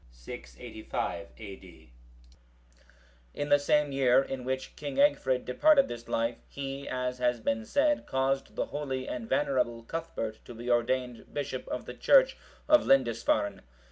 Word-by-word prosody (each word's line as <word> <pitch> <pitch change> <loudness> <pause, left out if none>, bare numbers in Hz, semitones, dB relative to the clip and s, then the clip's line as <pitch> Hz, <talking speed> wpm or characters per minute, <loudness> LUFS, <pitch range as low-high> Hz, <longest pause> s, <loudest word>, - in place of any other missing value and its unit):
[685 60 - -6
A.D.] 95 - -12 1.4
In 145 - -3
the 145 - +6
same 150 0 +2
year 135 -1 +4
in 135 -2 -5
which 130 +1 -3
King 145 -2 -5
Egfrid 140 -3 +3
departed 285 - +4
this 120 0 -7
life,(739) 115 +1 -1
he, 140 0 -5
as 125 0 -2
has 125 -1 +1
been 110 0 -1
said, 295 +1 +2
caused 135 +1 -1
the - - 0
holy 135 -3 -4
and 115 -3 -5
venerable 130 -4 +1
Cuthbert(740) 115 -6 -5
to 120 - -10
be 120 +2 -3
ordained 120 0 0
bishop 135 -3 -4
of - - -4
the - - -7
church - - +5 0.3
of 305 0 +6
Lindisfarne. 115 -6 +2
130 Hz, 140 wpm, -29 LUFS, 115-140 Hz, 1.4 s, the